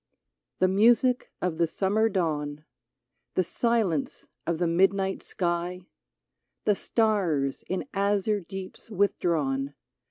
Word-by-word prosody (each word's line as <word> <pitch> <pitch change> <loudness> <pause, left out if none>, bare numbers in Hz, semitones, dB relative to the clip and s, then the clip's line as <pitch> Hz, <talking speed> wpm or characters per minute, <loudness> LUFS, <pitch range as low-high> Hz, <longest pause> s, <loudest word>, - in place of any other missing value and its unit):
The 185 - +4
music 235 +6 +3
of 175 -3 -1
the 170 - +4
summer 205 +6 +1
dawn, 150 -6 -2 0.7
The 185 - +3
silence 215 - 0 0.2
of 170 -1 +1
the 175 - +1
midnight 190 +3 +2
sky, 175 0 -2 0.8
The 210 - +5
stars, 190 - 0
in 185 - -2
azure 200 +1 +1
deeps 190 +4 -9
withdrawn. 155 -9 0
185 Hz, 105 wpm, -27 LUFS, 165-205 Hz, 0.8 s, The